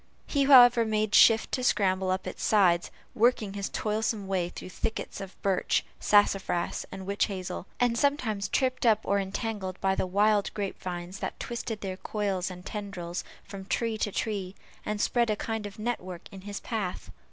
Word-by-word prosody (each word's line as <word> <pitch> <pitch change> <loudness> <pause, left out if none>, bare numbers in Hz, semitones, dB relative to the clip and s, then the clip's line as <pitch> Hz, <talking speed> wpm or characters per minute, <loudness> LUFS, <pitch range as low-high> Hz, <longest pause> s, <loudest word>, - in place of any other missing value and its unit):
He, 280 -2 +1
however, 245 -3 +8
made 215 -1 0
shift 225 -1 +6
to 255 - -1
scramble 190 -5 +2
up 185 0 -1
its - - -6
sides, 180 -5 +3 0.2
working 230 -4 +2
his 200 -1 -3
toilsome 215 -1 -1
way 185 -3 -1
through 185 - -9
thickets 220 +2 -4
of 195 -1 -9
birch, 195 -2 +1
sassafras, 195 -4 +2
and 190 0 -7
witch 200 +1 +1
hazel; 190 -2 -5
and 245 -1 +2
sometimes 235 -7 0
tripped 255 -1 0
up 225 -3 +4
or 200 0 +1
entangled 195 -1 -4
by 190 0 +2
the 190 - -1
wild 205 +2 +2
grape 200 -2 -4
vines 180 +1 -5
that - - -5
twisted 235 -2 -4
their 190 -2 -4
coils 195 -3 -2
and 180 0 -10
tendrils 185 -5 -5 0.2
from 195 -1 -9
tree 225 +4 -1
to 205 - 0
tree, 195 -3 -3 0.3
and 210 0 -2
spread 235 +2 +2
a 215 - +2
kind 220 0 -3
of 200 - -12
network 185 -6 -4
in 195 -2 -10
his 200 +1 -6
path. 210 -6 -4
200 Hz, 175 wpm, -28 LUFS, 190-225 Hz, 0.3 s, however